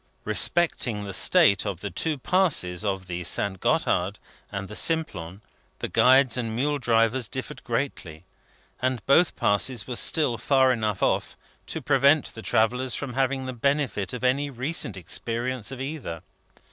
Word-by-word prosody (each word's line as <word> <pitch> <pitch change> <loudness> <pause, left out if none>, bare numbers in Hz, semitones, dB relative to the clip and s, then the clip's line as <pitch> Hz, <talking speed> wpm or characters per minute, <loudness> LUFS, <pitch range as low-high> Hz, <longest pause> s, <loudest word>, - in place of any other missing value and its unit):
Respecting 125 -11 +1
the 100 -1 -6
state 100 0 +5
of 100 -4 -4
the 105 - -5
two 155 - -1
Passes 130 - 0
of 95 -3 -2
the 90 0 -5
St. 95 +2 -1
Gotthard 95 +4 0 0.3
and 100 0 -5
the 105 - -9
Simplon, 105 - -1 0.3
the - - -4
guides 130 -1 +4
and 115 -3 -3
mule 145 +4 0
drivers 115 0 +1
differed 130 +2 -7
greatly; 115 - -4 0.6
and 130 -3 -1
both 165 +6 +4
passes 105 +2 +1
were 125 - -5
still 125 -3 +1
far 130 -2 +3
enough 110 -5 -1
off, - - 0 0.3
to - - -6
prevent 140 +1 +3
the 115 - -9
travellers 125 +4 +1
from 135 -4 -4
having 135 +1 0
the 130 - -4
benefit 135 -6 -1
of 125 - -6
any 140 +3 +1
recent 130 - -1
experience 115 +7 -3
of 135 - -7
either. 135 - -6
120 Hz, 155 wpm, -25 LUFS, 100-135 Hz, 0.6 s, state